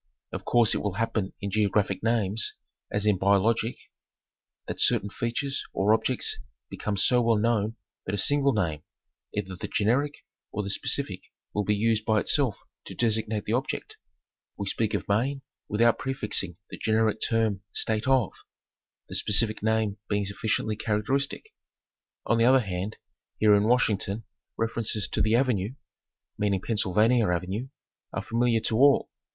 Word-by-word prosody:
Of - - -6
course 120 -3 +4
it - - 0
will 105 -2 -2
happen 110 -3 -1
in 100 -1 -3
geographic 105 -1 +1
names, 110 -2 0 0.4
as 105 0 0
in 105 -3 +3
biologic, 105 +4 +2 0.9
that - - -5
certain 100 - +2
features 135 +4 -2
or 100 +3 +3
objects 125 +3 0 0.3
become 105 -1 -3
so 125 +6 +4
well 115 -1 +3
known 110 0 +1 0.3
that 95 - -1
a - - -3
single 140 +6 +2
name, 85 - -1 0.5
either 95 -2 -4
the - - -6
generic 135 +8 0 0.3
or 105 - -2
the 100 - -2
specific - - -2 0.3
will 105 -1 0
be 105 - +2
used 110 +1 +1
by 110 -1 +2
itself 130 -1 +3 0.3
to - - -8
designate 110 -2 0
the 110 - -1
object. 130 +3 -3 0.6
We 100 - -3
speak 110 +2 0
of - - -3
Maine 135 +7 0 0.3
without 115 +2 +3
prefixing 105 -9 -1
the - - -8
generic 110 0 +1
term 110 -4 +1
"State 110 +2 -1
of," 130 -7 +3 0.7
the - - -9
specific 105 +1 +1
name 110 -1 0
being 105 -1 0
sufficiently 105 +1 -1
characteristic. 130 - -1 0.7
On 115 - +2
the 115 - +5
other 130 +1 +6
hand 95 0 -4 0.4
here 105 -1 +5
in 100 0 +4
Washington 110 -3 +1 0.3
references 110 -2 0
to - - -1
"the 110 +1 +3
Avenue" 120 -3 +1 0.6
meaning 100 -2 +1
Pennsylvania 110 +2 +2
Avenue 95 +8 -2 0.4
are - - -3
familiar 115 -1 +1
to 110 - +1
all. 140 +2 +4
110 Hz, 150 wpm, -27 LUFS, 100-115 Hz, 0.9 s, other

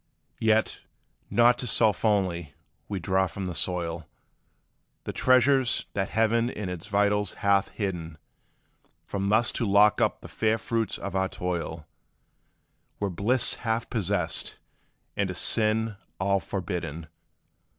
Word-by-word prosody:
Yet, 110 0 +2 0.5
not 120 +1 +4
to 125 - -3
self 110 -2 +2
only, 90 -8 0 0.3
we 100 -2 -2
draw 95 +2 +1
from 95 +2 -6
the 90 - -4
soil 85 -2 -2 1.0
The - - -5
treasures 130 0 +3
that 95 -1 -1
Heaven 115 +2 +2
in 105 -6 -5
its 90 +1 -6
vitals 105 -1 +1
hath 100 -1 +4
hidden; 85 -6 -4 0.9
For 100 - -4
thus 105 +4 +3
to 120 - -2
lock 100 +1 +5
up - - +1
the - - -9
fair 110 0 0
fruits 115 0 -2
of 100 - -6
our 95 0 +1
toil 85 -3 -4 1.1
Were 100 -2 -1
bliss 110 +8 +2
half 115 0 -2
possessed, 105 -7 0 0.6
and 100 -2 0
a 90 - -4
sin 110 +1 +1 0.2
all 100 +1 +2
forbidden. 85 -5 -4
100 Hz, 130 wpm, -27 LUFS, 90-110 Hz, 1.1 s, lock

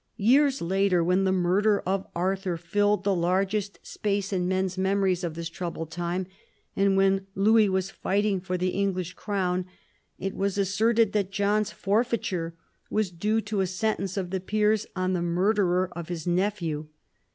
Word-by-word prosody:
Years 270 +4 +3
later, 190 0 +2
when 180 +3 +2
the 190 - +2
murder 190 +3 +2
of 190 +1 -2
Arthur 185 0 -1
filled 205 +4 +1
the 200 0 +2
largest 190 +3 0
space 200 -1 -2
in 180 -1 0
men's 185 0 0
memories 190 -1 +1
of 165 -2 -3
this 170 0 -4
troubled 165 -1 -5
time, 175 +2 -2 0.5
and 195 0 +3
when 195 0 +2
Louis 215 +1 +4
was 190 0 -1
fighting 200 0 0
for 185 0 -2
the 185 +1 0
English 185 -2 -1
crown, 185 -3 -2 0.5
it 195 +1 -3
was 200 0 -1
asserted 215 +3 +2
that 200 -3 0
John's 205 +1 +1
forfeiture 200 -6 -1 0.3
was 210 -4 0
due 210 +6 0
to 210 -2 -2
a 190 - +1
sentence 195 0 -2
of 180 -2 -3
the 190 - -1
peers 210 +2 +1
on 185 0 0
the 180 - 0
murderer 180 +1 +1
of 170 -2 -6
his 170 -3 -4
nephew. 175 -4 -1
190 Hz, 165 wpm, -26 LUFS, 180-205 Hz, 0.5 s, Louis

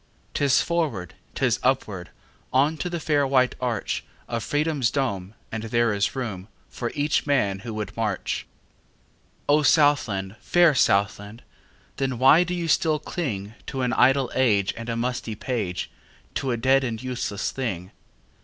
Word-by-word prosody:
'Tis 140 -2 +3
forward, 145 - -1 0.2
'tis - - +1
upward, - - 0 0.4
On 140 +5 +3
to 180 - -3
the 175 -1 -3
fair 145 -3 +1
white 130 -1 +3
archOf 120 -5 -2 0.4
Freedom's 145 -1 0
dome, 105 -8 -2 0.2
and 110 - -3
there 115 0 +2
is 100 0 +2
roomFor 115 0 -5
each 145 0 +1
man 105 -9 +1
who 115 +3 -7
would 105 -1 -5
march.O 115 +6 -4
Southland, 115 - +2
fair 175 -3 +4
Southland! 105 -1 +1 0.5
Then 135 -2 -1
why 135 +7 +6
do 180 0 -3
you 170 -1 -2
still 155 0 +2
clingTo 125 - -4
an 125 - 0
idle 135 0 +4
age 105 -7 +2
and 115 +1 -7
a 115 - -1
musty 120 -2 -2
page, 105 -7 -3 0.4
To 135 - -2
a 120 - 0
dead 130 +3 +3
and 115 -3 -2
useless 125 -5 -2
thing? 95 -8 -4
125 Hz, 140 wpm, -25 LUFS, 105-145 Hz, 0.5 s, why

